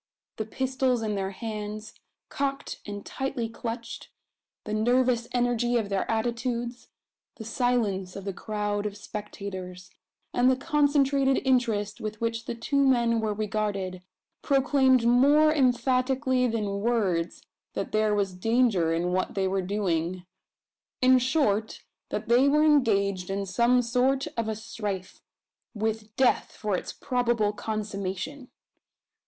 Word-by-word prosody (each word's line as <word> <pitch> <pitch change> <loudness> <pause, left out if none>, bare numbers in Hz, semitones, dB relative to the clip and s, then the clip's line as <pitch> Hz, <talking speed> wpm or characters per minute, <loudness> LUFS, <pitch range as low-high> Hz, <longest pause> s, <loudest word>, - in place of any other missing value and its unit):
The 220 - -2
pistols 260 0 0
in 215 -1 -1
their 195 -1 -2
hands, 210 0 -6 0.4
cocked 275 0 -3
and 205 0 -6
tightly 260 -3 -3
clutched; 230 +1 -6 0.5
the 210 - -5
nervous 240 +2 +2
energy 245 -1 +1
of 215 -3 -1
their 195 -1 -1
attitudes; 240 +2 -2 0.5
the 220 - -9
silence 220 -6 0
of 195 -1 -7
the 195 - -3
crowd 210 0 -2
of 205 0 -7
spectators; 190 -3 -7 0.4
and 245 +1 +4
the 260 - +4
concentrated 280 -2 +2
interest 225 -6 +1
with 215 0 -5
which 230 0 -2
the 235 - -4
two 280 +5 +1
men 235 -3 +3
were 215 -2 -1
regarded, 205 -3 -2 0.4
proclaimed 265 -3 +3
more 285 +6 +5
emphatically 255 -1 +2
than 210 -4 -2
words, 200 -8 0 0.3
that - - -3
there 215 -1 +2
was 195 -2 0
danger 215 -3 +2
in 170 +2 0
what 185 +1 -1
they 190 -1 +1
were 190 0 0
doing 180 -2 -1 0.8
in 255 0 +6
short, 240 -5 0 0.3
that - - -4
they 245 +4 +5
were 300 +2 +4
engaged 200 -11 +2
in 195 +1 -2
some 235 +6 +3
sort 255 +3 +1
of 230 -1 -1
a 220 - -2
strife, 205 -4 -5 0.5
with 220 0 -3
death 260 -2 +2
for 210 -3 -2
its - - -4
probable 240 -4 0
consummation! 210 +5 -4
225 Hz, 135 wpm, -27 LUFS, 205-250 Hz, 0.8 s, in